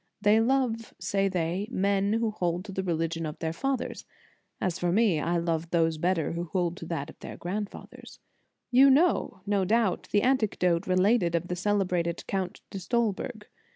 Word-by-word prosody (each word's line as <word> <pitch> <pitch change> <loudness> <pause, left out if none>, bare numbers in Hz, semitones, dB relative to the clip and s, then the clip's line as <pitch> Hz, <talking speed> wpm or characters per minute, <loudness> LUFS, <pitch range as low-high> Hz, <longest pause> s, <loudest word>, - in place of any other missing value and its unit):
They 210 +1 +4
love, 230 -2 0
say 195 +2 0
they, 180 +2 -1
men 200 -1 +1
who 225 -1 +1
hold 175 -2 -2
to 205 - -7
the 190 - -2
religion 165 -2 -1
of 150 - -6
their 160 -1 -3
fathers; 270 +7 -2 0.6
as 180 -3 -1
for 175 -1 +1
me, 200 -5 +3
I 170 +3 0
love 165 -1 -1
those 165 -2 +1
better 175 -1 +1
who 170 +1 -3
hold 175 0 -1
to 165 - -8
that 160 -4 -4
of - - -23
their - - -8
grand 200 +4 -3
fathers. - - -12 0.5
You 265 +3 +7
know, 275 - +2
no 200 -1 +1
doubt, 215 -1 +1
the 205 - +3
anecdote 200 -9 +1
related 185 -1 +3
of 170 +1 -2
the 180 - -1
celebrated 180 -3 0
Count 190 -2 -3
de 195 - -5
Stolberg. 220 0 -2
190 Hz, 180 wpm, -28 LUFS, 170-215 Hz, 0.6 s, You